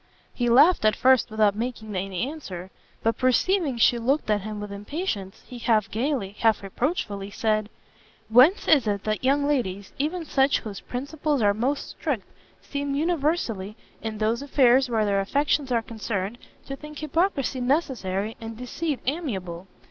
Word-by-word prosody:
He 240 -1 0
laughed 290 +8 +6
at 215 0 +4
first 260 -1 +4
without 215 -2 +2
making 220 -2 -4
any 190 +4 -2
answer; 190 - -7 0.3
but 225 0 +1
perceiving 275 - +2
she 235 +1 +4
looked 260 0 +1
at 205 -1 +2
him 215 +1 -6
with 205 0 -6
impatience, 205 - -4
he 245 - -9
half 220 -3 +1
gaily, 225 -4 -1
half 220 -3 +3
reproachfully, 200 - -2
said, 215 0 0 0.6
"Whence 255 - +5
is 280 -8 +5
it 200 -1 -1
that 215 +2 -2
young 280 +2 +3
ladies, 200 -9 -1
even 325 +4 -1
such 270 -1 +3
whose 205 -3 -7
principles 285 +1 -2
are 205 -1 +4
most 255 +7 -1
strict, - - -3 0.4
seem 280 -1 -3
universally, 285 - -1 0.2
in 220 -1 -4
those 220 +3 0
affairs 265 -2 +4
where 220 -2 +1
their 200 -1 +2
affections 280 +5 0
are 230 -2 +2
concerned, 220 -1 -4 0.3
to 275 - -5
think 300 +1 -10
hypocrisy 305 -4 0
necessary, 225 - -1
and 225 0 -7
deceit 275 +4 -3
amiable? 195 - -3
240 Hz, 155 wpm, -25 LUFS, 210-285 Hz, 0.6 s, laughed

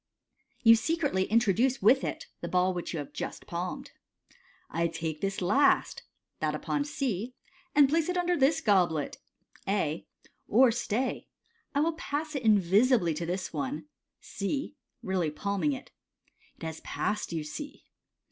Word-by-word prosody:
You 230 -1 +9
secretly 285 - 0
introduce 230 +4 +2
with 255 +7 +5
it - - -4
the - - -5
ball 185 +1 +2
which 175 -1 -4
you 165 - -3
have 145 -2 -6
just - - -5
palmed. - - -5 0.8
"I 170 +1 0
take 160 -2 -4
this 195 -1 -2
last" 265 +11 +3 0.4
(that - - 0
upon 290 0 -1
C), 250 -5 -3 0.4
"and 290 -2 +7
place 320 +4 +1
it 360 - 0
under 355 0 +2
this 280 0 +3
goblet 175 -8 +2 0.5
(A); 180 -6 -1 0.4
or, 250 +3 +5
stay, 240 +2 -2 0.5
I 285 - +3
will 330 +2 +2
pass 310 0 -4
it 275 - -2
in 220 -3 +5
visibly 195 0 +3
to 165 +2 -4
this 185 +2 -3
one 285 +2 -4 0.2
" - - -59 0.2
(C) 275 +9 -2
— 245 - -48
really 185 -6 0
palming 200 - -1
it. 260 - -8 0.3
" - - -34
It - - -14
has 160 -1 -5
passed, 210 -3 -2
you 160 -2 -2
Bae. 285 - -7
220 Hz, 160 wpm, -29 LUFS, 180-275 Hz, 0.8 s, You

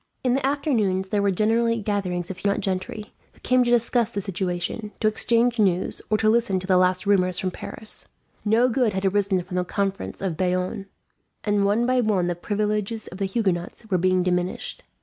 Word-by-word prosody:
In 250 -2 +2
the 270 - 0
afternoons 230 -10 0
there 205 0 +1
were 200 - +2
generally 225 +4 +2
gatherings 190 -4 -2
of 190 - -8
Huguenot 200 +1 0
gentry, 195 +3 -4 0.2
who - - -23
came 255 0 +3
to 240 - 0
discuss 240 -1 +2
the 220 - -3
situation, 185 +2 -3
to 215 - +2
exchange 235 +2 +2
news, 190 -3 +1
or 215 - +3
to 215 - +1
listen 220 -4 +2
to 185 - -8
the 185 -1 +3
last 185 +1 +2
rumours 185 -3 +2
from 185 - -1
Paris. 220 +4 -6 0.4
No 225 +4 +4
good 245 -3 +1
had 190 +1 -2
arisen 195 -1 +1
from 180 +1 -5
the 180 - +2
Conference 195 +1 -3
of 185 -5 -3
Bayonne, 185 +3 -1 0.6
and 205 -1 +2
one 210 +4 +2
by 255 0 +2
one 205 -6 +1
the 175 - 0
privileges 210 +4 -2
of 185 - -10
the 195 - 0
Huguenots 190 -1 -2
were 185 - +3
being 185 0 +2
diminished. 180 0 -2
200 Hz, 195 wpm, -24 LUFS, 185-225 Hz, 0.6 s, No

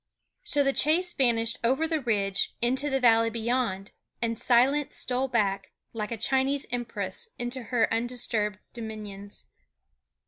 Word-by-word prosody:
So 290 -1 +3
the 275 0 +2
chase 350 +6 +3
vanished 230 -3 +1
over 265 +7 +2
the 320 -2 0
ridge 200 -5 0
into 260 +5 +1
the 270 -1 +1
valley 230 -2 +5
beyond; 230 -4 -1 0.3
and 230 -1 -2
silence 265 +4 +3
stole 255 +1 0
back, 200 -6 0 0.2
like 215 -1 -4
a 230 - -2
Chinese 270 +4 +1
empress, 245 - -4
into 245 +1 -3
her 245 -2 +2
disturbed 225 -3 -1 0.2
dominions. 210 -3 -6
240 Hz, 135 wpm, -27 LUFS, 220-265 Hz, 0.3 s, valley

